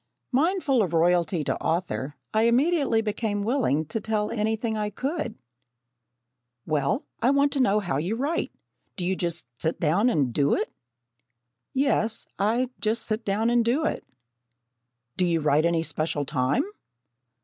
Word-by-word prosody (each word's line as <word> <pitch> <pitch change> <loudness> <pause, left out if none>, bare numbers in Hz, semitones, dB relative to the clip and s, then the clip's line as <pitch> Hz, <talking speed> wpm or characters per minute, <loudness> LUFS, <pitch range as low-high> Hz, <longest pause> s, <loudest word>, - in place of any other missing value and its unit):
Mindful 285 - +2
of 180 -5 -1
"royalty 170 0 +2
to - - -2
author," 165 -4 -2 0.2
I 220 +1 +3
immediately 260 -2 +2
became 210 -1 -2
willing 220 - +1
to 220 +9 -4
tell 215 -1 -1
anything 220 +1 -1
I 210 -1 -1
could. 265 - -3 1.3
"Well, 150 - 0 0.2
I 245 - +4
want 280 +1 +3
to 280 - -1
know 210 -5 +3
how 175 -9 -2
you 175 +9 -1
write. 285 +7 -1 0.4
Do 180 - -3
you 190 +1 +1
just 170 -2 -2 0.2
sit 160 - 0
down 180 +10 +3
and 140 - +1
do 140 +1 +3
it?" - - -3 1.0
"Yes, 260 -5 +1
I 235 +5 +1
just 220 +3 0
sit 215 +1 -2
down 215 +4 +1
and 240 -1 +4
do 260 +7 +1
it." - - -2 1.1
"Do 185 - +2
you 165 -1 +2
write 150 +1 +3
any 170 -1 +1
special 155 -3 -2
time?" 130 - +1
210 Hz, 150 wpm, -26 LUFS, 165-240 Hz, 1.3 s, I